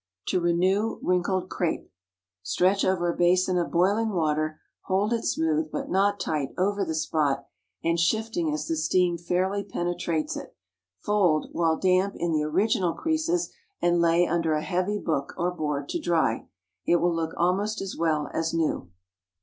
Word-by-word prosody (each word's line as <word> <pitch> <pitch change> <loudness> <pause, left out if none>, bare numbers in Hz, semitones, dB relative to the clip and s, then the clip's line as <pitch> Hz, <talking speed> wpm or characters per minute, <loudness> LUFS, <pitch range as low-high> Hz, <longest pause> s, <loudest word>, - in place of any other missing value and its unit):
TO 185 - +1
RENEW 185 +6 +1
WRINKLED 180 +1 +1
CRAPE. 175 -3 -2 0.5
Stretch 185 - +2
over 175 -2 +1
a - - -11
basin 180 +1 +3
of 170 - -1
boiling 200 +6 +2
water, 155 -4 0 0.3
holding 205 +5 +1
it - - -9
smooth, 155 -1 0
but - - -4
not 200 +2 +2
tight, 150 -4 -2
over 200 +2 +1
the 160 -3 -2
top, 145 -4 +1 0.4
and 170 0 +1
shifting 175 -2 0
as 150 0 -2
the 165 - -1
steam 175 +2 +2
fairly 185 +4 0
penetrates 175 -4 -2
it. - - -8 0.4
Fold, 180 - +1
while 165 -2 +1
damp, 185 +1 +2
in 170 0 -1
the 155 -1 +1
original 185 +4 +1
creases, 325 +2 0 0.3
and 175 0 +2
lay 170 +1 +4
under 165 -2 0
a 155 0 0
heavy 185 +4 -1
book 155 -8 -2
or 175 +1 0
board 150 -4 -3
to - - -2
dry. 165 -10 0 0.4
It 175 - +3
will 175 0 +2
look 165 -1 -2
almost 195 +5 +1
as 195 -1 -5
well 155 -3 0
as 165 0 -1
new. 155 - -1
175 Hz, 165 wpm, -26 LUFS, 160-190 Hz, 0.5 s, lay